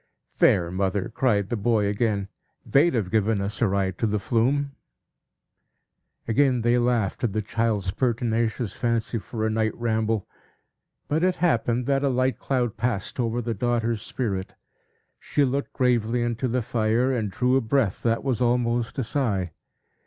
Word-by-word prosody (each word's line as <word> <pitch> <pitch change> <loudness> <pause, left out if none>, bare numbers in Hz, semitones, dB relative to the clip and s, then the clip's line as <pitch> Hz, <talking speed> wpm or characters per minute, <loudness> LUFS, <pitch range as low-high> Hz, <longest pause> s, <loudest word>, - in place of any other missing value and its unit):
"There, 85 -1 +4
mother!" 95 +1 -1
cried 105 -6 +1
the 120 - -1
boy, 110 0 +1
again. 100 -1 0 0.4
"They'd 140 +2 +3
have 105 -6 -1
given 110 -1 +2
us 100 +2 -4
a 115 - +4
ride 95 -2 -1
to 115 - +1
the 105 0 0
Flume." 130 +7 +1 1.6
Again 125 +1 +2
they 120 +1 +3
laughed 120 -5 0
at 115 -5 0
the 110 - 0
child's 105 -3 -1
pertinacious 115 -1 -1
fancy 115 -1 -1
for 110 +1 -4
a 110 - 0
night 110 0 0
ramble. 110 -2 -1 0.8
But 155 +3 0
it 185 0 +2
happened, 120 -7 +1
that 135 +1 +1
a 140 - +2
light 130 0 0
cloud 120 -4 -1
passed 115 -1 -2
over 120 0 0
the 115 0 -2
daughter's 115 0 -1
spirit; 100 -6 -3 0.6
she 145 - +1
looked 140 +2 -2
gravely 120 -2 +1
into 120 +2 -1
the 125 0 -1
fire, 115 +4 +1
and 110 -5 -1
drew 125 +6 +1
a 135 - +3
breath 115 -3 0
that 115 -1 0
was 130 -3 -1
almost 120 0 +1
a 135 - 0
sigh. 105 - -1
115 Hz, 160 wpm, -25 LUFS, 105-125 Hz, 1.6 s, There